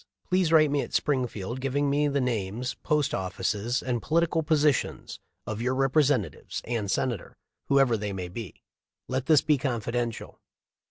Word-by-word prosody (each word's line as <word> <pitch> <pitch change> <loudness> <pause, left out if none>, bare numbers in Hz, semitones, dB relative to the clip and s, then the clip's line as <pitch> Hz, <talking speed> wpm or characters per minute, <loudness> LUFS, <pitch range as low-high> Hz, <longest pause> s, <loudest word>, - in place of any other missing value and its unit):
Please 180 -3 +3
write 155 -3 +5
me 145 -1 +2
at - - -5
Springfield 125 -4 -1
giving 140 +2 0
me 145 +1 +2
the 140 0 0
names, 120 -1 -2
post 150 -2 0
offices, 100 +5 -1
and 120 -3 -1
political 165 +3 +1
positions 150 -3 0 0.3
of 110 +1 -4
your 125 +2 0
Repre 135 +3 +3
sentative 130 -7 -1
and 115 -4 -2
Senator, 115 0 -2 0.3
whoever 135 -4 +4
they 105 -1 -3
may 95 -2 -4
be. 100 +2 -8 0.4
Let 130 0 -2
this 155 -3 +6
be 150 -3 +2
confidential." 120 -3 -3
130 Hz, 155 wpm, -27 LUFS, 115-145 Hz, 0.4 s, this